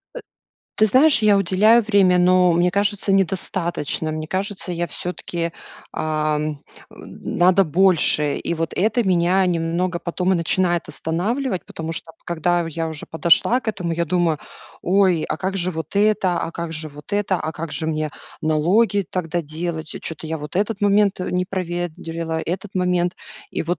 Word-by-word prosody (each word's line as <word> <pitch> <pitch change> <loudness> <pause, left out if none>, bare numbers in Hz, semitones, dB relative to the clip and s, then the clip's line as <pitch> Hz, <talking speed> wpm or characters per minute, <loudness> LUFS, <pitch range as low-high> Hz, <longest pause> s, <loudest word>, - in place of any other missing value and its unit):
Э, - - -5 0.6
ты 215 - +4
знаешь, 260 +2 +4
я 210 -1 +5
уделяю 205 +5 +4
время, 195 -4 +3
но 180 0 +4
мне 175 +1 +2
кажется 205 +1 0
недостатачно. 175 -4 0
Мне 155 0 -4
кажется, 190 0 -3
я 175 0 -2
всё-таки, 170 -1 -4 0.4
ам, 155 -1 -1 0.3
н - - -8
надо 185 +2 +5
больше. 160 -3 +3
И - - -3
вот 165 -1 -3
это 225 +6 +2
меня 180 +1 +3
немного 175 +1 -1
потом 180 +2 -1
и 185 - +3
начинает 175 +1 0
останавливать. 195 - -2
Потому 160 0 -5 0.3
когда 175 0 0
я 165 +1 -3
уже 160 -1 -5
подошла 170 +9 +3
к 230 - -6
этому, 180 -5 -2
я 170 +1 0
думаю: 170 -2 +1 0.4
"Ой, 185 -3 +3
а - - -1
как 190 +1 -2
же 185 0 0
вот 160 +1 -6
это? 200 -3 +2
А 165 - -3
как 170 -1 -5
же 155 0 -5
вот 150 +7 -13
это? 205 -2 +1
А 155 - -3
как 165 -1 -6
же 160 - -2
мне 155 -1 -1 0.3
налоги 185 +6 +2
тогда 175 -1 -2
делать? 160 +1 -4
Чё-то 160 -1 -5
я 160 +1 -3
вот 150 +3 -7
этот 205 0 -1
момент 200 -1 +3
не 180 0 -1
проверила, 170 -3 -4
этот 190 +4 -5
момент", 180 -1 +1 0.4
и - - -2
вот 175 +2 -2
175 Hz, 165 wpm, -21 LUFS, 165-195 Hz, 0.6 s, я